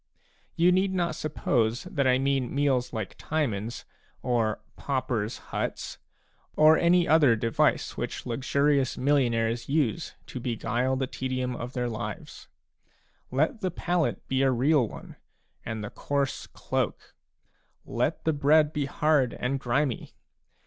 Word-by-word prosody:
You 175 Hz, +2 st, +4 dB
need 190 Hz, +1 st, +2 dB
not 170 Hz, -3 st, 0 dB
suppose 125 Hz, -6 st, 0 dB
that 140 Hz, -1 st, -1 dB
I 130 Hz, 0 st, +4 dB
mean 135 Hz, -1 st, 0 dB
meals 135 Hz, -3 st, +1 dB
like 110 Hz, -5 st, -4 dB
Timon's, 120 Hz, -7 st, -2 dB, 0.4 s
or 115 Hz, -4 st, +1 dB
" -, -, -38 dB
paupers' 125 Hz, -5 st, -1 dB
huts/' -, -, -3 dB
b -, -, -42 dB, 0.5 s
or 155 Hz, +1 st, +7 dB
any 175 Hz, +1 st, +3 dB
other 145 Hz, -6 st, +5 dB
device 115 Hz, 0 st, +1 dB
which -, -, -4 dB
luxurious 135 Hz, +2 st, +1 dB
millionaires 120 Hz, -4 st, +1 dB
use 140 Hz, -7 st, 0 dB
to -, -, -7 dB
beguile 120 Hz, +2 st, -1 dB
the 130 Hz, 0 st, 0 dB
tedium 130 Hz, -1 st, -3 dB
of 120 Hz, +2 st, -6 dB
their 125 Hz, -1 st, -1 dB
lives. 110 Hz, -2 st, -6 dB, 0.8 s
Let 155 Hz, -, 0 dB
the 185 Hz, -, 0 dB
pallet 175 Hz, -1 st, -1 dB
be 135 Hz, 0 st, +1 dB
a 135 Hz, -, +4 dB
real 130 Hz, +1 st, +3 dB
one, -, -, -11 dB, 0.5 s
and 110 Hz, -1 st, -4 dB
the 105 Hz, -, -6 dB
coarse 140 Hz, -1 st, -2 dB
cloak; -, -, -3 dB, 0.7 s
let -, -, -1 dB
the 160 Hz, -, +3 dB
bread 150 Hz, +1 st, +4 dB
be 145 Hz, -2 st, -1 dB
hard 145 Hz, -3 st, +2 dB
and 135 Hz, +2 st, -2 dB
grimy. 130 Hz, +1 st, -1 dB
130 Hz, 140 wpm, -27 LUFS, 120-150 Hz, 0.8 s, or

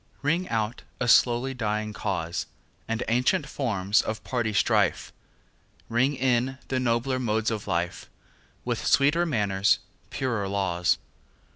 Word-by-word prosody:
Ring 170 Hz, +5 st, 0 dB
out 110 Hz, +1 st, -1 dB, 0.2 s
a 125 Hz, -, -1 dB
slowly 120 Hz, +2 st, +4 dB
dying 105 Hz, -3 st, -2 dB
cause, 90 Hz, -5 st, -3 dB, 0.4 s
And 115 Hz, +1 st, -1 dB
ancient 125 Hz, +8 st, +2 dB
forms 105 Hz, -6 st, +1 dB
of 110 Hz, -, -5 dB
party 120 Hz, -4 st, -1 dB
strife; 100 Hz, -, +1 dB, 0.8 s
Ring 130 Hz, +5 st, +2 dB
in 130 Hz, 0 st, +1 dB
the 130 Hz, -, 0 dB
nobler 125 Hz, +1 st, 0 dB
modes 110 Hz, -2 st, 0 dB
of 105 Hz, -2 st, -4 dB
life, 85 Hz, -2 st, -2 dB, 0.6 s
With -, -, -2 dB
sweeter 150 Hz, +5 st, +3 dB
manners, 100 Hz, -8 st, +2 dB, 0.3 s
purer 115 Hz, -7 st, -2 dB
laws. 95 Hz, -3 st, +1 dB
115 Hz, 125 wpm, -26 LUFS, 105-130 Hz, 0.8 s, slowly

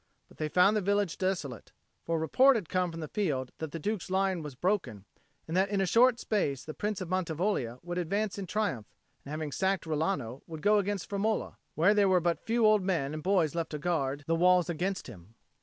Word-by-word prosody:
But -, -, -19 dB
they 155 Hz, -1 st, -2 dB
found 180 Hz, +6 st, +4 dB
the 215 Hz, -, +1 dB
village 200 Hz, -2 st, 0 dB
desolate; 170 Hz, -, -3 dB, 0.3 s
for 165 Hz, 0 st, -1 dB
report 255 Hz, -, +5 dB
had 205 Hz, -8 st, -3 dB
come 180 Hz, -1 st, +1 dB
from 165 Hz, 0 st, -7 dB
the 155 Hz, -, -4 dB
field 145 Hz, -12 st, -2 dB
that 160 Hz, -, -4 dB
the -, -, -4 dB
Duke's 205 Hz, +4 st, -3 dB
line 190 Hz, -2 st, +1 dB
was 150 Hz, -4 st, -7 dB
broken, 130 Hz, -, -1 dB, 0.4 s
and 165 Hz, -, -3 dB
that 190 Hz, +1 st, +3 dB
in 200 Hz, -1 st, 0 dB
a 195 Hz, -, +2 dB
short 235 Hz, +5 st, +4 dB
space 145 Hz, -, -1 dB
the 155 Hz, -, -6 dB
Prince 205 Hz, +1 st, -3 dB
of 185 Hz, -, -4 dB
Mantivoglia 170 Hz, -, -1 dB
would 175 Hz, +1 st, -3 dB
advance 200 Hz, +4 st, -1 dB
in 190 Hz, -, -5 dB
triumph, 160 Hz, -, -2 dB, 0.4 s
and -, -, -11 dB
having 155 Hz, 0 st, -4 dB
sacked 190 Hz, +4 st, 0 dB
Rilano, 155 Hz, -6 st, -2 dB
would 160 Hz, -2 st, -8 dB
go 210 Hz, 0 st, +5 dB
against 200 Hz, -2 st, -2 dB
Firmola, 210 Hz, +2 st, -1 dB, 0.2 s
where 180 Hz, +7 st, +4 dB
there 205 Hz, -2 st, +3 dB
were 185 Hz, -1 st, +4 dB
but 170 Hz, 0 st, 0 dB
a -, -, -35 dB
few 230 Hz, 0 st, +2 dB
old 215 Hz, -1 st, +5 dB
men 165 Hz, -7 st, -1 dB
and 155 Hz, -, -5 dB
boys 175 Hz, -4 st, +2 dB
left 165 Hz, -1 st, -2 dB
to 150 Hz, -, -4 dB
guard 145 Hz, -4 st, -1 dB
the 165 Hz, -, 0 dB
walls 180 Hz, +1 st, +4 dB
against 185 Hz, +3 st, -2 dB
him. 105 Hz, -2 st, -13 dB
180 Hz, 225 wpm, -30 LUFS, 155-200 Hz, 0.4 s, report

